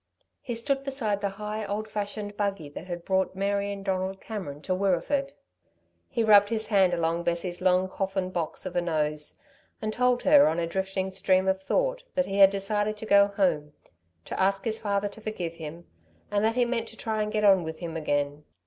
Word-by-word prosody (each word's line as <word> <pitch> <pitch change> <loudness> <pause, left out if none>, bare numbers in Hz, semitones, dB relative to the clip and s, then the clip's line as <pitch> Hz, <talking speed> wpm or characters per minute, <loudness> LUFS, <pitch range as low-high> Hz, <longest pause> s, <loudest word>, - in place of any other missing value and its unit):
He 240 - -4
stood 270 +4 -1
beside 235 -7 -1
the 200 - 0
high, 210 +1 -4
old 210 +2 -3
fashioned 205 0 -4
buggy 200 -7 -2
that 160 +5 -9
had 175 -1 -6
brought 190 0 +1
Mary 200 +1 0
and 200 -1 -7
Donald 190 0 -1
Cameron 185 -11 -6
to 185 - -1
Wirreeford. 200 +10 0 0.8
He 230 - 0
rubbed 205 -2 +6
his 220 -2 -2
hand 190 -4 +4
along 165 0 0
Bessie's 175 +1 -2
long 185 0 +3
coffin 190 -1 -2
box 170 -1 -3
of 185 - -5
a 175 - +2
nose, 150 -3 -1 0.4
and 215 0 -3
told 250 0 +2
her 285 0 +7
on 160 +2 0
a 170 - 0
drifting 190 +2 -2
stream 190 0 +2
of 190 0 +1
thought - - 0
that 275 -1 +2
he 195 +1 -2
had 195 -1 +9
decided 205 +2 -1
to 220 - -7
go 200 -1 +6
home, 175 -8 0 0.5
to - - -5
ask 195 +2 +1
his 220 -1 -1
father 200 -1 0
to 205 +2 -11
forgive 185 -6 -4
him, 165 +1 -8 0.5
and 205 0 +1
that 225 +1 +2
he 250 -1 +3
meant 235 -2 -2
to 225 - -11
try 220 -1 -1
to 210 - -3
get 210 0 -1
on 195 -3 +6
with 160 0 -5
him 165 -1 -6
again. 145 -1 -1
195 Hz, 205 wpm, -27 LUFS, 180-215 Hz, 0.8 s, had